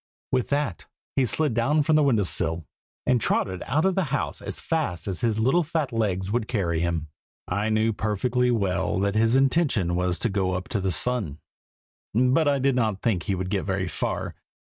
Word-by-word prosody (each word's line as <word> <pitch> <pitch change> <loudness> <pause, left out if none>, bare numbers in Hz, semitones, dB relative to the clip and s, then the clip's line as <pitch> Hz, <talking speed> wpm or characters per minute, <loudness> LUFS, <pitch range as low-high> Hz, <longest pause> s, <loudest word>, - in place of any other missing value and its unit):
With 130 -2 +1
that, 140 - -2 0.3
he 135 - +3
slid 135 +5 0
down 145 +7 +2
from 155 +2 +3
the 155 - +5
window 125 -8 +3
sill, 85 -3 0 0.4
and 125 -2 +2
trotted 95 -3 0
out 155 +6 +1
of 190 - +3
the 190 -1 +1
house 145 +1 -2
as - - -6
fast 105 - -2
as 95 -5 -3
his 115 -2 +1
little 130 +10 +3
fat 155 -4 -2
legs 100 -4 -1
would 115 -1 0
carry 85 -8 0
him. 85 -2 -1 0.4
I 100 +4 -1
knew 110 +1 +2
perfectly 120 +4 0
well 95 -5 0
that 100 0 +1
his 115 +2 +3
intention 135 - +2
was 90 0 0
to - - 0
go 95 -2 0
up 90 +1 -4
to 100 - -1
the 95 - 0
sun, 100 - +1 0.8
but 130 +6 +3
I 140 -1 +3
did 135 0 +1
not 110 -5 0
think 110 -8 +1
he 95 +4 -1
would 90 0 -4
get 100 -2 +1
very 95 -1 -2
far. - - -3
110 Hz, 200 wpm, -25 LUFS, 95-130 Hz, 0.8 s, the